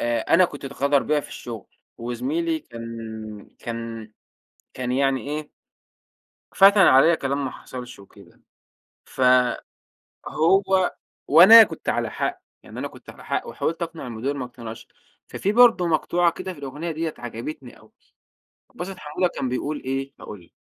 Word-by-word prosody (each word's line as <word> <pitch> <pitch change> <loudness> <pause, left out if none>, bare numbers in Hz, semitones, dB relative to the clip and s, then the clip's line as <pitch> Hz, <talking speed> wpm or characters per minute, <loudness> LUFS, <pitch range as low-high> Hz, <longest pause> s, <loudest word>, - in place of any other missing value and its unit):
آآ، 120 -1 0
أنا 185 +9 +4
كنت 145 -5 -6
اتغدر 140 +1 +1
بيّا 150 0 +1
في - - -12
الشغل، 115 -4 -8 0.3
وزميلي 140 +8 -2
كان 115 -4 -9
كان 115 -2 -7 0.6
كان 125 -1 -3
يعني 135 0 +1
إيه، 150 0 -5 1.0
فتَن 200 +1 +7
عليَّ 160 +1 +6
كلام 140 0 -2
ما 130 - -3
حصلش 125 -1 -10
وكده 100 -1 -18 0.7
ف - - -8 1.1
هو 190 +3 +2 0.3
وأنا 190 +10 +10
كنت - - -5
على - - -1
حق، - - -3 0.2
يعني - - -10
أنا - - -3
كنت - - -15
على - - -13
حق - - -2
وحاولت 165 +1 -3
أقنع 165 -4 -5
المدير 125 +4 -3
ما 130 - -4
اقتنعش، 115 -2 -10 0.4
ففي 200 - -2
برضه 230 -6 +5
مقطوعة 170 +1 +2
كده 185 - -6
في 170 - -14
الأغنية 145 +5 -5
ديَّة 160 0 -3
عجبتني 120 +3 -8
أوي، - - -21 0.8
عبد - - -12
الباسط 190 +1 -6
حمودة 150 +5 -1
كان 130 - -2
بيقول 145 +4 -3
إيه، 135 +1 -3
هاقول 100 -4 -10
لك - - -31
140 Hz, 150 wpm, -23 LUFS, 120-165 Hz, 1.1 s, وأنا